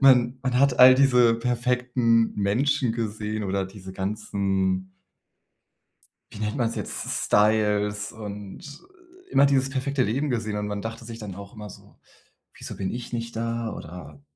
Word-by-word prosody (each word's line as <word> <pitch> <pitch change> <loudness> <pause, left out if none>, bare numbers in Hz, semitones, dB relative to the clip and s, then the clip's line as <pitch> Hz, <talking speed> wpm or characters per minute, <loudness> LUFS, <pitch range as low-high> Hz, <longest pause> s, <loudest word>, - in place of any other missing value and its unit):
Man 130 -2 +5
man 125 -1 0
hat 135 -2 +3
all 130 0 +10
diese 125 -3 +5
perfekten 120 -1 +1
Menschen 120 +5 +1
gesehen 110 -2 -3
oder 95 0 -1
diese 95 -1 -11
ganzen 95 -2 -1 1.4
wie - - -10
nennt 105 +4 -2
man 120 -3 +1
es 115 - -6
jetzt: - - -4 0.3
Styles 105 -1 +2
und 105 - -9 0.5
immer 140 - +5
dieses 135 -1 +2
perfekte 135 0 0
Leben 135 +7 -1
gesehen. 110 -4 -2
Und 105 0 -2
man 105 -1 -4
dachte 115 +2 -6
sich 115 0 -8
dann 100 -4 -7
auch 100 0 -10
immer 105 -1 -9
so: - - -16 0.6
„Wieso - - -8
bin 95 - -3
ich 120 0 -7
nicht 115 0 -4
da?“ 115 -1 -2
Oder 75 -4 -10
115 Hz, 155 wpm, -25 LUFS, 105-125 Hz, 1.4 s, all